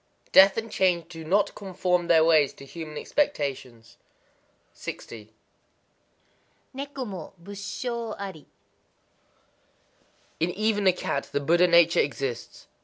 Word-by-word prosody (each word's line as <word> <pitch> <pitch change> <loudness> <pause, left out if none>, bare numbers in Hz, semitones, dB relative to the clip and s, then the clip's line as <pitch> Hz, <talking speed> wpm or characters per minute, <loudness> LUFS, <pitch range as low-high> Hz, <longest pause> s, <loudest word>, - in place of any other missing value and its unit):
Death 190 +2 +7
and 225 -1 -4
Change 175 -4 +1
do 165 -2 -9
not 200 +5 +1
conform 180 -2 -1
their 160 -2 +5
ways 155 -4 +4
to 140 - -13
human 155 +1 -8
expectation. 135 - -2 0.9
60.—Neko 115 - -11
mo 185 -6 -8
Busshō 210 +5 -5
ari. 190 -6 -8 1.9
In 165 - +1
even 205 +1 0
a - - +8
cat 140 -5 -3
the 145 - 0
Buddha 170 +5 +3
nature 170 -1 +5
exists. 130 -3 -3
175 Hz, 110 wpm, -26 LUFS, 145-200 Hz, 1.9 s, a